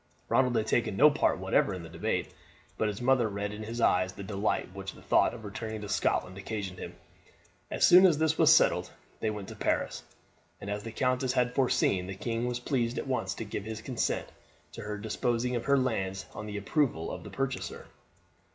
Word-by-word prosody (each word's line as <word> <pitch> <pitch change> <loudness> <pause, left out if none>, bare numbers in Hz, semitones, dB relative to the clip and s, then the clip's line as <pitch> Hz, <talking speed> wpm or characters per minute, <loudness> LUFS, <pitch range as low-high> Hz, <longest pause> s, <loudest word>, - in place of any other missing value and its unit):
Ronald 125 -2 +3
had 110 -1 +2
taken 110 -3 0
no 150 +2 +7
part 145 - +2
whatever 95 +1 +1
in 90 - -7
the - - -8
debate, 80 - -2 0.4
but 110 - 0
his 105 +3 -4
mother 125 -3 +3
read 100 0 -3
in 105 - -7
his 115 +2 -5
eyes 95 -4 +3
the 100 - -8
delight 100 -2 -1
which 95 0 -6
the - - -15
thought - - +3
of 115 -2 -10
returning 110 +1 -5
to 105 - -7
Scotland 95 -2 0
occasioned 100 -2 -5
him. - - -7 0.7
As - - +3
soon 185 +2 +9
as 165 -5 +2
this 160 0 +2
was - - +6
settled - - +4 0.3
they 110 - 0
went 105 -2 -5
to - - -8
Paris, - - -1 0.6
and 100 - -5
as 105 0 -2
the 115 - -7
countess 130 +2 0
had 125 -1 +1
foreseen, 100 -8 +2
the 95 - -5
king 115 +3 -2
was 125 0 -2
pleased 120 -2 -1
at - - -2
once 100 -8 -1
to - - -5
give 100 -1 -5
his 110 0 -6
consent 125 -4 -1 0.4
to 115 - -8
her 105 -1 -4
disposing 120 +3 -1
of 120 - -3
her 140 0 +4
lands 95 -7 -1
on 105 - -7
his 105 -1 -4
approval 100 - 0
of 90 - -6
the - - -9
purchaser. 135 -1 -4
110 Hz, 210 wpm, -30 LUFS, 100-125 Hz, 0.7 s, soon